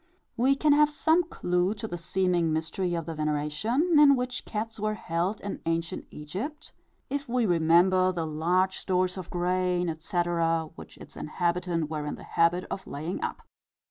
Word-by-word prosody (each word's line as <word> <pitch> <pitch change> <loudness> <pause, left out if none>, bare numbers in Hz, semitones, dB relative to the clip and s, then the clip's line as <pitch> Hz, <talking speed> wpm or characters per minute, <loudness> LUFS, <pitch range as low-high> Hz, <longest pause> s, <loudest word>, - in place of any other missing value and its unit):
We 260 +4 +3
can 295 +1 +3
have 300 0 +5
some 320 +3 +3
clue 180 - 0
to 220 +1 -5
the 175 - -5
seeming 175 -1 0
mystery 165 +3 -1
of 165 -2 -3
the 165 - -4
veneration, 155 - +1
in 285 -2 +8
which 250 0 -3
cats 225 +1 -4
were 215 +1 -1
held 180 +2 -2
in 200 - -5
ancient 165 0 -2
Egypt, 230 - -6 0.4
if 285 -2 -3
we 245 -1 +1
remember 180 +2 +4
the 170 -3 -3
large 175 +5 +1
stores 185 0 0
of 185 -3 -7
grain, 180 0 0
etc., 165 -1 0
which - - -12
its - - -13
inhabitants 170 0 -1
were 150 -1 -4
in - - -3
the - - -12
habit 170 +2 +2
of 190 - -5
laying 155 +6 -4
up. - - -4
180 Hz, 170 wpm, -28 LUFS, 165-215 Hz, 0.4 s, in